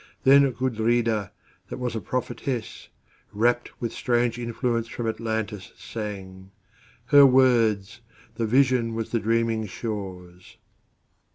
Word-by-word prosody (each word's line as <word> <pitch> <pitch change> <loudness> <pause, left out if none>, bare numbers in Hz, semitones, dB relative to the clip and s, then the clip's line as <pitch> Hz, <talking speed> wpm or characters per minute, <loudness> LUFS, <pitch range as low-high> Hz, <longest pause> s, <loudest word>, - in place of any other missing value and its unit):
Then 140 +1 +6
Gudrida, 115 -4 0 0.4
that - - -6
was 125 -2 -3
a 110 - -3
prophetess, 125 -1 -4 0.4
Rapt 120 +3 0
with 115 -2 -3
strange 120 -1 0
influence 115 0 -2
from 115 0 -5
Atlantis, 110 -3 -4
sang:Her 105 +6 0
words: 115 -5 +2 0.3
the 115 0 -2
vision 125 -2 +2
was 115 -1 -4
the 115 - +1
dreaming 115 0 0
shore's. 95 -4 -7
115 Hz, 105 wpm, -25 LUFS, 105-120 Hz, 0.4 s, Then